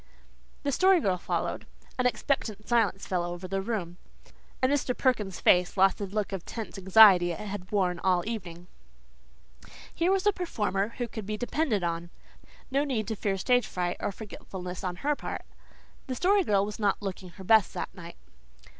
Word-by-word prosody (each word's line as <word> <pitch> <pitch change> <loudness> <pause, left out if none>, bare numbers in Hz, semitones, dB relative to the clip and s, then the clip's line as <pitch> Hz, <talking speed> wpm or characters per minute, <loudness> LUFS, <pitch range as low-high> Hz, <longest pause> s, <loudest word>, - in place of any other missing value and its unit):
The 285 - 0
Story 375 +5 +5
Girl 185 - 0
followed. - - -3 0.3
An 250 - +4
expectant 220 -5 -2
silence 225 -5 +1
fell 180 -2 -1
over 175 +1 -5
the 195 +1 -2
room, 190 -5 -3 0.6
and 260 +1 +2
Mr. 270 -3 0
Perkins' 210 -8 0
face 180 +2 +3
lost 190 +1 +4
the 200 - -3
look 205 +1 -2
of 190 -3 -4
tense 220 -3 -7
anxiety 190 -2 +7
it - - -8
had 205 -3 -6
worn 180 -4 +1
all 180 -1 +2
the - - -5
evening. 175 -6 -7 1.3
Here 340 +3 +1
was 390 0 +1
a 415 - +4
performer 215 - -2
who 245 - -2
could 220 -3 -7
be 215 0 -2
depended 245 - 0
on. 170 0 -2 0.6
No 275 +2 +2
need 245 -7 -2
to 220 - -2
fear 195 -1 -1
stage 245 +4 +2
fright 180 -1 -2
or - - -2
forgetfulness 190 -3 -8
on 180 -1 -2
her 290 +9 0
part. - - -6 0.6
The 260 - -3
Story 390 +7 +3
Girl 200 - +2
was 210 +1 -7
not 205 -1 0
looking 190 -1 -5
her 190 - -9
best 220 +1 +5
that - - -4
night. 170 -2 -10
205 Hz, 180 wpm, -28 LUFS, 185-245 Hz, 1.3 s, anxiety